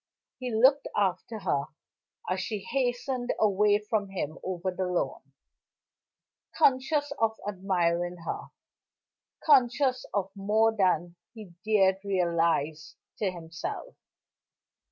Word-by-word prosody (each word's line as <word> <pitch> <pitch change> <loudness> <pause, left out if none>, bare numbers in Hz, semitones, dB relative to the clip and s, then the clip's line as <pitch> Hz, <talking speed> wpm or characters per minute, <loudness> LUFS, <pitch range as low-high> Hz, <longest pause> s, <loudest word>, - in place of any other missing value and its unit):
He 250 -1 -4
looked 260 +6 +4
after 200 +3 0
her 155 -8 0 0.6
as 185 +1 -1
she 215 +3 -3
hastened 250 -1 -1
away 205 0 +4
from 210 -1 -2
him 165 -5 -4
over 185 0 -2
the 185 0 -2
lawn; 180 -1 -1 1.3
conscious 285 +2 +2
of 220 0 +1
admiring 180 -3 0
her, - - -4 1.0
conscious 255 -2 +3
of 195 -2 -1
more 215 +3 +2
than 175 -3 +1 0.2
he 210 -6 -11
dared 195 -3 +3
realize 170 -4 0 0.2
to 205 - +1
himself. 165 -2 -6
200 Hz, 105 wpm, -28 LUFS, 180-225 Hz, 1.3 s, looked